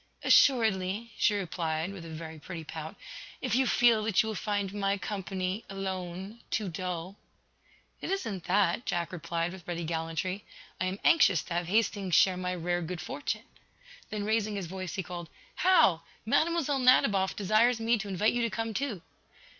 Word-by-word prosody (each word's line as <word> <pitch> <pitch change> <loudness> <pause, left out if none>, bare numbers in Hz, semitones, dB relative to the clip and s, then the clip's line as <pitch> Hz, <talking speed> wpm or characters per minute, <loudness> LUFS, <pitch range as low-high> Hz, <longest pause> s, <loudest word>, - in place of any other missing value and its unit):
"Assuredly," 220 -3 +4
she 210 - +3
replied, 170 -2 -2
with 190 -4 -8
a 165 - -9
very 160 0 -7
pretty 165 +3 -7
pout, 160 0 -7 0.4
"if - - -2
you 260 +1 +3
feel 235 -3 +4
that 215 -1 +3
you - - -4
will - - -2
find 205 -1 -2
my 200 -1 0
company, 190 0 -3
alone, 190 +2 -5
too 210 -3 -1
dull." 180 +2 -4 0.8
"It - - -4
isn't 225 - -3
that," 195 +2 +2
Jack 170 -1 -1
replied, 170 0 -2
with 185 -3 -12
ready 170 -1 -3
gallantry. 165 +4 -2 0.4
"I - - 0
am 185 +1 -2
anxious 320 - +5
to - - -6
have 175 0 -1
Hastings 200 -2 +1
share 190 -1 +5
my 180 0 -2
rare 175 0 -1
good 175 +1 -4
fortune." 275 - -4 0.7
Then 210 -2 -3
raising 215 0 0
his 195 -3 -3
voice 185 0 -5
he 190 - -2
called: 175 -1 -7 0.3
"Hal, 195 - +5 0.2
Mlle. 310 +2 +2
Nadiboff 205 -7 +4
desires 220 +4 +3
me 225 0 +2
to 205 - -5
invite 200 +3 +1
you 240 - 0
to 230 - +1
come, 225 +1 -3
too." 220 -7 -3
190 Hz, 170 wpm, -30 LUFS, 175-220 Hz, 0.8 s, anxious